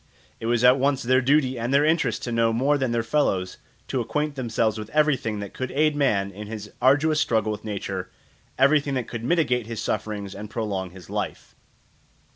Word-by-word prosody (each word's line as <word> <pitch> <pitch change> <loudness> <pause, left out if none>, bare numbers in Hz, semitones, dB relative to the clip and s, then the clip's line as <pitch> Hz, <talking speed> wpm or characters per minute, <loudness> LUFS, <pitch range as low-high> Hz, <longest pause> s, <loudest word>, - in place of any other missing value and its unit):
It 115 - -4
was 120 0 +1
at 125 +2 +6
once 135 0 +1
their 130 +2 +3
duty 130 -1 +2
and 120 +2 -2
their 140 +2 +4
interest 160 +1 +1
to 120 - -3
know 115 -1 +2
more 135 +6 +2
than 130 -4 0
their 115 -1 0
fellows, 105 -8 0 0.3
to 130 - 0
acquaint 150 +5 -2
themselves 115 -4 -1
with 105 0 -7
everything 145 -8 +1
that 100 - -7
could 130 -1 -4
aid 150 +2 +2
man 105 -9 +1
in 105 +2 -8
his 105 -1 -7
arduous 150 +4 +4
struggle 110 -7 +1
with 105 0 -6
nature, 100 -3 -4 0.5
everything 140 +1 +3
that 125 -2 -2
could 115 -1 -6
mitigate 125 -6 +1
his 115 -2 -5
sufferings 100 -2 -3
and 105 +1 -8
prolong 100 -5 -3
his 90 -2 -13
life. - - -5
120 Hz, 195 wpm, -24 LUFS, 105-140 Hz, 0.5 s, at